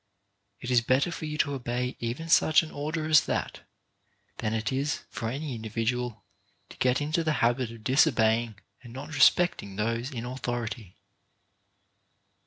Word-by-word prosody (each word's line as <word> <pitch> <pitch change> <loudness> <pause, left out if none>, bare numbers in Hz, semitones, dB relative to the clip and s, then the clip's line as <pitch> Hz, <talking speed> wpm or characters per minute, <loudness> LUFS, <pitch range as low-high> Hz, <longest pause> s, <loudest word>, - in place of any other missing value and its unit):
It 125 - -5
is 120 -1 +5
better 130 +8 +2
for 160 - -5
you 150 0 -4
to 145 -1 +1
obey 125 -1 -3
even 120 +8 -4
such 155 0 +5
an 155 - -8
order 155 +2 -3
as 155 -1 +5
that, - - -2 0.8
than 110 - -2
it 110 -1 -1
is 140 +2 -1
for 115 - -3
any 140 +3 -4
individual 115 +1 -3 0.5
to - - -13
get 125 +2 +2
into 155 +3 0
the 155 -1 +1
habit 120 0 +1
of 115 -2 -12
disobeying 115 -5 +3 0.3
and 120 -2 -12
not 145 +5 -8
respecting 145 - +3
those 115 +4 -1
in 120 -4 -5
authority. 120 -5 -4
125 Hz, 155 wpm, -28 LUFS, 115-150 Hz, 0.8 s, is